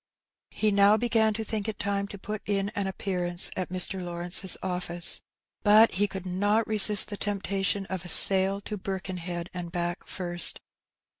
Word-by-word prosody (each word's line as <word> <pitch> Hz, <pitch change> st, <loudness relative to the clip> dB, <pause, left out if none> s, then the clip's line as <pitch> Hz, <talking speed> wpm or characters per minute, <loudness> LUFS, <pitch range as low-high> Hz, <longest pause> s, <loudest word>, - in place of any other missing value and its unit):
He 215 Hz, -1 st, -1 dB
now 200 Hz, +1 st, +4 dB
began 225 Hz, -1 st, +1 dB
to 220 Hz, -, -4 dB
think 215 Hz, -1 st, -4 dB
it 215 Hz, -1 st, -4 dB
time 200 Hz, 0 st, -2 dB
to 200 Hz, -, -10 dB
put 210 Hz, +2 st, -6 dB
in 200 Hz, -1 st, -1 dB
an 205 Hz, -2 st, -4 dB
appearance 180 Hz, -2 st, -3 dB
at 185 Hz, -, -4 dB
Mr. 185 Hz, +1 st, +1 dB
Lawrenee^s 175 Hz, +2 st, 0 dB
office. 180 Hz, -1 st, +1 dB, 0.4 s
But 215 Hz, +2 st, +5 dB
he 205 Hz, +3 st, 0 dB
could 190 Hz, -1 st, -8 dB
not 205 Hz, +5 st, 0 dB
resist 210 Hz, -1 st, +5 dB
the 205 Hz, -, -6 dB
tempta 200 Hz, -1 st, -3 dB
tion 195 Hz, 0 st, -1 dB
of 190 Hz, -2 st, -6 dB
a 175 Hz, -, -9 dB
sail 195 Hz, +2 st, +5 dB
to 210 Hz, +1 st, -6 dB
Birkenhead 185 Hz, -2 st, -6 dB
and 175 Hz, -2 st, -6 dB
back 175 Hz, 0 st, -4 dB
first. 175 Hz, -2 st, 0 dB
195 Hz, 170 wpm, -26 LUFS, 180-205 Hz, 0.4 s, But